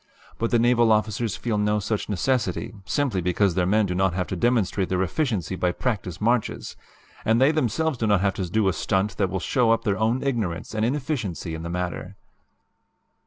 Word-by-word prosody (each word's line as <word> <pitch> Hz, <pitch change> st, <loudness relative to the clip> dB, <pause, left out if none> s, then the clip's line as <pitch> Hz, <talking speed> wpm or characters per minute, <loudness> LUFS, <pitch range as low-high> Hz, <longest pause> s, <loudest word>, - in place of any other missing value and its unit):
But 115 Hz, -, 0 dB
the 120 Hz, -, +3 dB
naval 120 Hz, -1 st, +4 dB
officers 110 Hz, 0 st, +1 dB
feel 110 Hz, -3 st, -1 dB
no 105 Hz, 0 st, +1 dB
such 105 Hz, +1 st, -2 dB
necessity, 110 Hz, 0 st, -1 dB
simply 130 Hz, -10 st, 0 dB
because 90 Hz, +2 st, +1 dB
their 90 Hz, 0 st, +1 dB
men 105 Hz, +2 st, +3 dB
do 90 Hz, -, -2 dB
not 95 Hz, -1 st, +1 dB
have 90 Hz, -1 st, 0 dB
to -, -, -2 dB
demonstrate 105 Hz, -2 st, +1 dB
their 95 Hz, 0 st, +1 dB
efficiency 100 Hz, -, -1 dB
by 90 Hz, -1 st, 0 dB
practice 95 Hz, -6 st, -3 dB
marches, 120 Hz, +2 st, 0 dB, 0.5 s
and 110 Hz, +1 st, +3 dB
they 135 Hz, +3 st, +5 dB
themselves 155 Hz, 0 st, 0 dB
do 110 Hz, -, 0 dB
not 100 Hz, -3 st, +3 dB
have 100 Hz, -1 st, +1 dB
to 95 Hz, -3 st, -4 dB
do 105 Hz, +2 st, +1 dB
a 95 Hz, -, +2 dB
stunt 95 Hz, +5 st, -1 dB
that 95 Hz, -2 st, +1 dB
will 95 Hz, -, -2 dB
show 120 Hz, +5 st, +1 dB
up 115 Hz, 0 st, +3 dB
their 100 Hz, -3 st, 0 dB
own 115 Hz, +4 st, +1 dB
ignorance 110 Hz, -12 st, -2 dB
and 110 Hz, 0 st, -1 dB
inefficiency 120 Hz, -, -2 dB
in 80 Hz, -, -5 dB
the 85 Hz, -, -5 dB
matter. 90 Hz, +1 st, -4 dB
105 Hz, 200 wpm, -24 LUFS, 95-120 Hz, 0.5 s, they